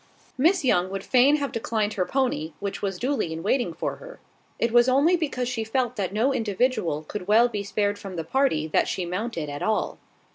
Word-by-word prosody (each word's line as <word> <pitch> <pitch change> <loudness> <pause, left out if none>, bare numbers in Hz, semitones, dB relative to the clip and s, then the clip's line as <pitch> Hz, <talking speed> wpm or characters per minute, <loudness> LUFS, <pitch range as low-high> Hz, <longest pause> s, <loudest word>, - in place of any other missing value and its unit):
Miss 330 +4 +2
Young 180 -6 +2
would 195 0 -5
fain 260 +3 +4
have 285 -2 -2
declined 220 -2 -1
her 185 -4 -1
pony, 245 - -1
which 200 -1 -4
was 195 -2 -2
duly 255 - -1
in 160 +1 -5
waiting 220 -2 +1
for 160 - -4
her. - - -12 0.4
It 235 - 0
was 240 +1 +5
only 285 +7 +4
because 275 -7 -2
she 240 -2 -2
felt 245 +2 -1
that 195 -4 -2
no 230 +7 +1
individual 210 - 0
could 180 +3 -7
well 225 +3 +5
be 210 -4 -4
spared 205 0 -1
from 195 -2 -8
the 165 - -3
party 260 - +1
that - - +2
she 185 - -2
mounted 180 -2 -3
at 145 0 -6
all. 220 -1 -1
220 Hz, 210 wpm, -25 LUFS, 185-255 Hz, 0.4 s, was